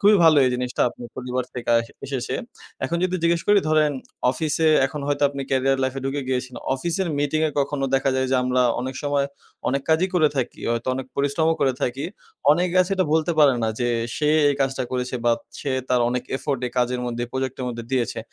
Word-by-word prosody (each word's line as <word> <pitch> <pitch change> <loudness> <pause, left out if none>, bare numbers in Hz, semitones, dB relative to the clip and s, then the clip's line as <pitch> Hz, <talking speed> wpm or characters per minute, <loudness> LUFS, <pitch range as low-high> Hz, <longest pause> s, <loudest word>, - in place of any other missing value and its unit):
খুবই 210 -1 +6
ভালো 160 -2 +7
এই 130 - +3
জিনিসটা 125 0 -1
আপনি 120 - -11
পরিবার 125 0 -2
থেকে 120 -1 -6
আস 115 0 +1 0.2
এসেছে। 130 -2 -3 0.5
এখন 170 - -1
যদি 185 0 0
জিজ্ঞেস 170 0 +2
করি 205 0 +6
ধরেন 155 -1 +3 0.4
অফিসে 160 +3 +1 0.2
এখন 150 +2 -6
হয়তো 145 0 -1
আপনি 140 -1 -5
ক্যারিয়ার 135 0 +2
লাইফে 130 +1 -1
ঢুকে 135 +1 -1
গিয়েছেন। 130 -1 -2 0.2
অফিসের 170 +6 -2
মিটিং 145 +2 0
এ - - -4
কখনো 140 0 -1
দেখা 135 0 +2
যায় 130 - +1
যে 130 - +3
আমরা 125 0 +2 0.2
অনেক 130 +1 -4
সময় 145 -1 +1 0.4
অনেক 140 +1 0
কাজই 160 +4 +3
করে 155 -4 +5
থাকি। 130 - -2
হয়তো 120 +2 -1
অনেক 130 0 -4
পরিশ্রমও 150 +4 +2
করে 135 -2 +3
থাকি। 130 +3 -1 0.5
অনেকে 175 +3 +2
আছে 185 - -7
এটা 185 -3 +2
বলতে 160 +2 +2
পারে 145 -3 +7
না 110 - +1
যে, 120 - +1 0.3
সে 150 -1 +1 0.2
এই 140 - +2
কাজটা 135 -1 0
করেছে 125 0 -2
বা 120 - +5 0.3
সে 145 - -3 0.2
তার 125 -1 +3
অনেক 125 0 -1
এফোর্ট 140 -2 -2
এই 120 - -7
কাজের 125 0 +1
মধ্যে 120 0 -3
এই - - -11
প্রজেক্টের 130 -1 -3
মধ্যে 120 -1 -5
দিয়েছে। 125 -3 0
135 Hz, 210 wpm, -23 LUFS, 125-155 Hz, 0.5 s, ভালো